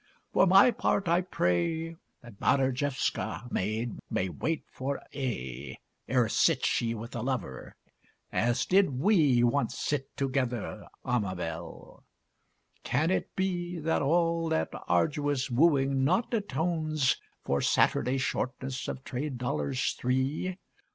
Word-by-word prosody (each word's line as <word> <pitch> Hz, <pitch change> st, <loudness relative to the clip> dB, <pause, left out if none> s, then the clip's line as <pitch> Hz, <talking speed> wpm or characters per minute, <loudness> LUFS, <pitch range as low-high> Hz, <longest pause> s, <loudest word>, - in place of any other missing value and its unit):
For 190 Hz, -, +5 dB
my 195 Hz, +7 st, +7 dB
part, 205 Hz, -4 st, 0 dB
I 170 Hz, +2 st, +3 dB
pray 165 Hz, -, 0 dB, 0.3 s
That 120 Hz, -4 st, -13 dB
Badarjewska 130 Hz, -1 st, 0 dB
maid 110 Hz, +4 st, -2 dB
may 90 Hz, -, 0 dB
wait 160 Hz, -, -2 dB
for 135 Hz, +1 st, -3 dB
aye 65 Hz, -, -4 dB, 0.3 s
Ere 125 Hz, -3 st, +3 dB
sits -, -, +2 dB
she 115 Hz, -1 st, 0 dB
with 115 Hz, +2 st, -8 dB
a 120 Hz, -, -2 dB
lover, 125 Hz, -, -4 dB, 0.6 s
as 120 Hz, +3 st, +1 dB
did 185 Hz, -9 st, +3 dB
we 150 Hz, -, +4 dB
Once 130 Hz, +4 st, +1 dB
sit 135 Hz, -2 st, -3 dB
together, 130 Hz, -4 st, -2 dB, 0.2 s
Amabel! 90 Hz, -8 st, -4 dB, 0.8 s
Can 155 Hz, +7 st, +1 dB
it -, -, -2 dB
be 175 Hz, -2 st, -1 dB
That 160 Hz, 0 st, 0 dB
all 165 Hz, +2 st, +2 dB
that 160 Hz, -, 0 dB, 0.2 s
arduous 145 Hz, -4 st, +1 dB
wooing 135 Hz, -1 st, +3 dB
not 190 Hz, -, +1 dB
atones 160 Hz, -, 0 dB, 0.3 s
For 70 Hz, 0 st, +1 dB
Saturday 125 Hz, +3 st, +2 dB
shortness 130 Hz, 0 st, -3 dB
of 130 Hz, -, -5 dB
trade 135 Hz, +1 st, -4 dB
dollars 130 Hz, +1 st, -1 dB
three? 135 Hz, +9 st, -1 dB
135 Hz, 120 wpm, -29 LUFS, 120-165 Hz, 0.8 s, my